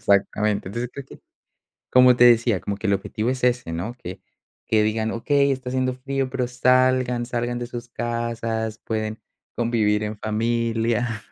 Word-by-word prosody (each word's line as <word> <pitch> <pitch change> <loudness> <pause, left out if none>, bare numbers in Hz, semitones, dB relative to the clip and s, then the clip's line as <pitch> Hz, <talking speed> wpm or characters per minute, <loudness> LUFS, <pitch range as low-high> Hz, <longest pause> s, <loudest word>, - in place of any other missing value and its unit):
exactamente. 100 0 +1
Entonces 120 +4 -4
creo 140 - -7
que, - - -14 0.7
como 125 -1 +7
te 120 - +4
decía 115 -4 +4
como 100 -1 -4
que 110 - -3
el 100 - +3
objetivo 105 +3 -2
es 130 -1 -3
ese, 125 -8 +1
¿no?, 85 +9 -4
que 90 +2 -7 0.4
que 110 -1 +2
digan 110 +1 0
okey, 140 +4 +2
está 130 -1 -3
haciendo 130 0 0
frío, 135 +1 -3
pero 125 -2 -1
salgan, 125 0 +2
salgan 120 0 -2
de 120 - -4
sus 120 0 -8
casas, 115 -2 -3
pueden 110 -1 -3 0.3
convivir 110 -3 +1
en 105 0 -4
familia. 115 +1 -1
120 Hz, 165 wpm, -23 LUFS, 110-125 Hz, 0.7 s, como